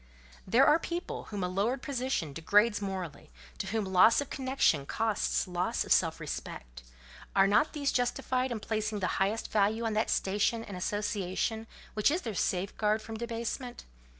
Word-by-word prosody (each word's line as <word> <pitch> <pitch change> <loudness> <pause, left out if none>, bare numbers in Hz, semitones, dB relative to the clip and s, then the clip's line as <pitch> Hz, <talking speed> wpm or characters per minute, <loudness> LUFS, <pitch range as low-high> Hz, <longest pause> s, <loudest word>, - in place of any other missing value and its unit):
There 240 +8 +5
are 300 +2 +5
people 345 +2 -4
whom 205 -3 -4
a - - +1
lowered 210 +8 -1
position 255 - -2
degrades 205 +8 +3
morally, 190 -6 -5 0.3
to - - -3
whom 215 +1 -1
loss 190 +4 +5
of 285 - -4
connection 260 - +1
costs 220 -3 0
loss 180 0 -1
of - - -8
self - - +2
respect: - - -7 0.5
are 195 -1 +6
not 205 +10 +3
these 285 -3 0
justified 255 +1 0
in 230 - -2
placing 215 0 -2
the 185 0 -1
highest 205 +4 0
value 215 +2 +2
on 225 - 0
that 215 +1 +1
station 210 +4 +1
and 200 - -8
association 205 +3 -2 0.3
which 215 +3 +3
is 335 +5 -1
their 225 - -3
safeguard 205 +4 0
from 220 0 -8
debasement? 235 +2 -4
215 Hz, 165 wpm, -30 LUFS, 195-235 Hz, 0.5 s, are